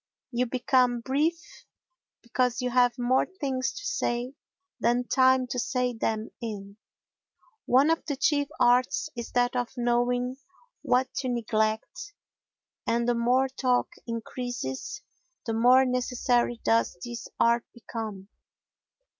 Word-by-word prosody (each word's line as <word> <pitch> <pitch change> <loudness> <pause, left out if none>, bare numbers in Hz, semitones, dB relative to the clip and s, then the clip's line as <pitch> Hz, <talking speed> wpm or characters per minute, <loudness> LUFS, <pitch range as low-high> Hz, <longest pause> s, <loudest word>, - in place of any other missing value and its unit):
You 245 0 0
become 250 -1 +2
brief 295 +7 +1 0.9
because 250 +1 0
you 250 -1 -1
have 245 -1 +3
more 250 +1 +2
things 260 -4 -1
to - - -8
say 255 - -1 0.5
than 240 +1 +2
time 260 -1 +4
to 250 - -1
say 250 0 0
them 225 -1 -2
in. 200 -3 -6 0.9
One 270 +6 +5
of 325 - 0
the 285 - -1
chief 285 +1 +1
arts 250 +5 +3
is 235 -1 -6
that 245 +1 +2
of 245 -1 -1
knowing 245 +1 +1 0.4
what 255 +1 +1
to 260 - -1
neglect 220 - -1 0.7
and 235 +1 +1
the 240 - +3
more 245 +3 +2
talk 255 -1 0 0.2
increases 230 - -5 0.4
the 225 - -2
more 250 +4 +5
necessary 245 -1 0
does 115 +7 +2
this 240 -1 -6
art 235 0 +3
become. 220 -4 -7
245 Hz, 125 wpm, -27 LUFS, 235-255 Hz, 0.9 s, One